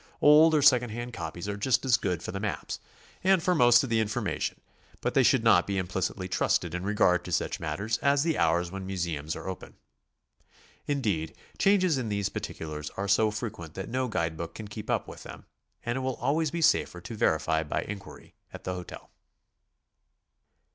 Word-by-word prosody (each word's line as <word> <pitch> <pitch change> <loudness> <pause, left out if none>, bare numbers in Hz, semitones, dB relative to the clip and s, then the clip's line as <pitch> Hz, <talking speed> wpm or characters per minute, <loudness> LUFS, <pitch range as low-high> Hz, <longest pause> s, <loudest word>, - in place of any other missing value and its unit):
Old 155 +2 +7
or 150 - +3
second 125 -3 +5
hand 120 +3 -6
copies 85 +1 -6
are 100 - -2
just 120 +4 +1
as 125 -3 +5
good 90 -8 -2
for - - -4
the 100 - -4
maps, 105 0 -4 0.4
and 190 -2 +4
for 180 - +3
most 120 -6 +6
of 130 - -4
the 115 - +3
information; 105 -1 -2 0.4
but - - -2
they - - +5
should - - +4
not - - +5
be 100 -1 -1
implicitly 95 +1 -2
trusted 90 -2 0
in 90 - -3
regard 95 -2 +2
to - - -7
such - - -1
matters 100 +9 -2
as 140 0 +3
the 165 -1 +1
hours 85 +1 +1
when 95 -1 -6
museums 85 -5 -3
are - - -8
open. 95 - -7 1.1
Indeed, 105 - -1 0.2
changes 185 -7 +3
in 115 -4 -3
these 100 -1 -1
particulars 75 -5 -6
are 100 +1 -2
so 110 +3 +4
fre 105 +2 -3
quent 85 -7 -11
that 95 - -6
no 130 +1 -1
guide 80 -7 -1
book 85 +1 -6
can 110 - -7
keep 105 +1 -8
up - - 0
with - - -10
them, - - -11 0.4
and 120 +1 -1
it - - -2
will 130 -1 -2
always 150 +5 0
be 170 +2 -2
safer 155 - +2
to 115 - -7
verify 80 -4 +1
by 75 - -2
inquiry 100 -1 -9 0.2
at - - -10
the 90 - -3
hotel. 90 -1 -9
105 Hz, 195 wpm, -28 LUFS, 90-130 Hz, 1.1 s, Old